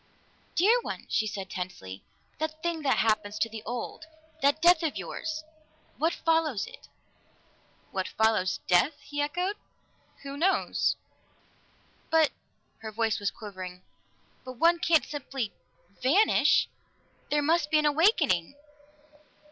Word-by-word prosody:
"Dear 440 +8 +4
one!" - - -6
she 220 - +1
said 195 -2 -5
tensely. 140 - -6 0.4
"That 315 0 -4
thing 340 -2 -1
that 275 -3 +2
happens 215 -1 +1
to 215 +2 +1
the 225 -1 -8
old 245 +5 -5 0.4
that 285 +2 +3
death 345 0 +6
of 320 -3 -1
yours! 315 -1 -4 0.6
What 325 +3 +2
follows 320 -10 +1
it?" - - -13 1.0
"What - - -2
follows 220 -4 +1
death?" 250 - +3
he 290 0 -4
echoed. 360 +7 -1 0.7
"Who 280 0 -6
knows?" 370 +5 +2 1.1
"But 320 -2 +4 0.3
" - - -43
Her 220 -1 -7
voice 220 0 0
was 205 -1 0
quivering. 185 -4 -9 0.6
"But 255 - -7
one 335 +7 +3
can't 325 -2 +3
simply 270 -6 -4 0.5
vanish! 350 - +4 0.6
There 295 0 +2
must 315 0 +2
be 310 - +4
an 305 - +2
awakening." 295 - +3
285 Hz, 130 wpm, -28 LUFS, 215-320 Hz, 1.1 s, death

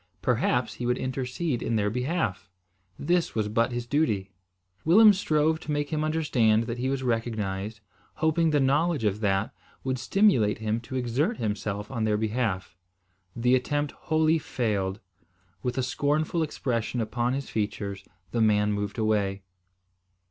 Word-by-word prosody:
Perhaps 125 -2 +1
he 120 +3 -4
would 125 +1 +1
intercede 130 +2 -2
in 115 - -1
their 105 -1 +1
behalf! 125 - -2 0.5
This 175 +3 0
was 110 -2 0
but 115 +3 +1
his 120 0 -3
duty. 120 -9 0 0.5
Willem 210 +6 +7
strove 160 -4 +1
to 155 - -6
make 145 -1 -1
him 155 0 0
understand 130 -9 +2
that 115 +1 -5
he 130 +2 0
was 135 -1 -1
recognised, 110 -3 -2 0.3
hoping 160 +1 +2
the 150 -1 +2
knowledge 145 +1 +2
of 105 -1 +1
that 100 0 0 0.3
would 130 -1 -1
stimulate 190 - +3
him 110 +1 -1
to 125 +3 -8
exert 130 - 0
himself 105 0 -3
on 115 -4 -2
their 105 -1 +2
behalf. 105 -5 -2 0.6
The 125 +2 +2
attempt 145 +3 +1
wholly 160 +1 +1
failed. 105 -8 -2 0.6
With 125 -1 -3
a 130 - +1
scornful 145 +5 0
expression 125 -6 -2
upon 120 +2 -1
his 135 0 -4
features, 100 -2 -3 0.3
the 115 - 0
man 105 -1 +3
moved 105 +1 -3
away. 100 -3 0
120 Hz, 150 wpm, -27 LUFS, 110-145 Hz, 0.6 s, Willem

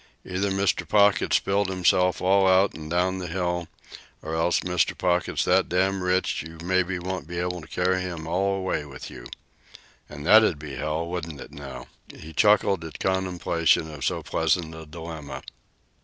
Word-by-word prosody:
Either 95 +2 -1
Mr. 95 -3 0
Pocket's 100 -2 +4
spilled 100 0 +1
himself 90 0 +2
all 95 +1 +4
out 95 +1 +4
an' 75 -1 -9
down 90 +2 +1
the 90 - -5
hill, 90 -1 -2 0.6
or 80 - -5
else 80 +2 +1
Mr. 90 -1 0
Pocket's 90 -1 +1
so - - +4 0.3
rich 95 -1 0
you 80 +1 -10
maybe 95 0 +1
won't 90 -3 -5
be 85 +1 -6
able 90 0 -2
to - - -12
carry 95 +1 0
him 85 -3 -5
all 95 +4 0
away 95 -5 -2
with 70 -3 -9
you. - - -10 0.8
And 75 0 -8
that'd 110 -3 +6
be 70 -1 -8
an 65 - -5
awful 75 +2 -1
shame, 85 - -7
wouldn't 85 -4 -5
it, - - -10
now?" 65 -3 -9 0.3
He 80 +1 -11
chuckled 100 -1 +3
at 80 - -8
contemplation 90 -4 +1
of 70 -3 -7
so - - -1
pleasant 80 -3 0
a 80 -1 -10
dilemma. 80 -2 -8
90 Hz, 175 wpm, -25 LUFS, 80-95 Hz, 0.8 s, that'd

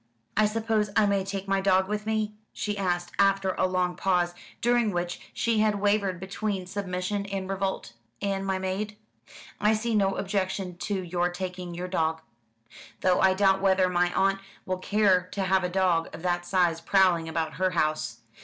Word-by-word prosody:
"I 215 0 +4
suppose 220 -1 0
I 220 - +5
may 200 -1 +1
take 195 0 -5
my 195 0 +1
dog 190 -1 +3
with 210 +1 -3
me?" 215 -1 0 0.2
she 210 -1 -3
asked, 175 -3 -1
after 195 -1 +3
a 185 - +1
long 180 -1 0
pause, 180 -2 +1 0.3
during 240 -2 +2
which 175 -2 -2
she 230 -2 0
had 215 -1 +3
wavered 200 -3 +1
between 195 0 -3
submission 195 +1 -3
and 195 -1 -4
revolt, 190 -9 -3 0.3
"and 195 -1 -1
my 190 -1 0
maid?" 195 +3 -3 0.6
"I 210 +1 +3
see 230 +2 -1
no 195 -2 +2
objection 190 -2 -2
to 200 +1 -2
your 175 0 0
taking 180 -1 -5
your 180 +1 -4
dog; 160 -3 0 0.8
though 185 -1 +3
I 190 0 +5
doubt 190 -1 +3
whether 190 -1 +3
my 175 0 +2
aunt 195 0 +2 0.3
will 185 0 -2
care 190 -2 +2
to 195 - -1
have 190 0 +2
a 180 - 0
dog 180 -3 +1
of 165 - -11
that 175 -1 -1
size 175 -3 +2
prowling 175 -2 +3
about 160 -1 -2
her 185 - +4
house. 155 -8 -1
190 Hz, 180 wpm, -27 LUFS, 180-200 Hz, 0.8 s, I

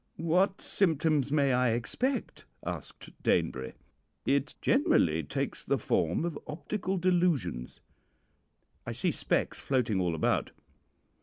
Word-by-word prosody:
"'What 180 +4 +2
symptoms 155 -6 +2
may 140 -3 +3
I 125 -2 +3
expect?' 245 - -2 0.2
asked - - -7
Danebury. 65 0 0 0.5
"'It 140 +1 +1
generally 235 - +3
takes 70 - -3
the - - +1
form 85 - 0
of 170 -4 -3
optical 185 +5 -3
delusions.' 170 - 0 1.1
"'I - - -2
see - - 0
specks - - -1
floating 120 -8 +1
all 85 -2 0
about.' 80 - +1
145 Hz, 110 wpm, -30 LUFS, 110-180 Hz, 1.1 s, may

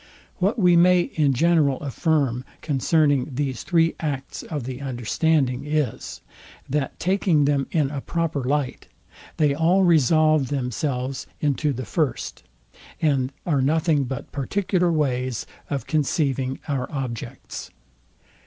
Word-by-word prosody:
What 195 +5 +1
we 180 -5 +5
may 180 +1 +6
in 150 -5 +1
general 150 -1 +3
affirm 140 -3 0 0.2
concerning 145 -2 +1
these 135 -3 -2
three 165 -2 +2
acts 140 -4 -4
of 150 -5 -5
the 130 +2 -6
understanding 135 +1 0
is, 150 -5 -2 0.5
that 140 0 -2
taking 180 -5 +2
them 140 -1 +1
in 150 -5 +1
a 140 -2 -4
proper 165 -4 -2
light, 140 0 -1 0.5
they 150 -2 +3
all 170 +6 +3
resolve 155 -3 +4
themselves 130 0 -2
into 150 0 +1
the 130 -1 -4
first, 150 -1 -2 0.6
and 135 -4 +1
are 145 -6 +2
nothing 155 0 +2
but 130 0 -6
particular 180 +4 0
ways 130 -6 -1 0.2
of 135 -4 -2
conceiving 140 -4 0
our 135 -4 -2
objects. 130 -6 -6
145 Hz, 125 wpm, -23 LUFS, 130-160 Hz, 0.6 s, may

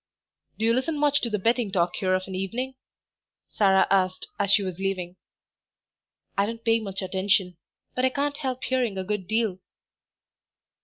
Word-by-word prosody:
"Do 220 - 0
you 230 - +4
listen 280 +6 0
much 290 0 +3
to 235 - -1
the 210 - 0
betting 230 +1 +1
talk 175 -1 +1
here 185 -1 +2
of 185 - -1
an 190 - -7
evening?" 230 +8 -3 0.8
Sarah 190 -2 +4
asked, 185 -1 +2
as 200 - +1
she 200 +1 +5
was 185 -2 -5
leaving. 185 -2 -2 1.2
"I 200 +1 +2
don't 230 +1 -6
pay 225 0 +4
much 195 -3 -5
attention, 190 -1 +1 0.4
but 255 - -1
I 260 - +5
can't 285 +2 -1
help 260 -3 -3
hearing 245 -6 0
a 190 - -1
good 200 -1 -3
deal." 220 -4 0
205 Hz, 170 wpm, -26 LUFS, 190-245 Hz, 1.2 s, she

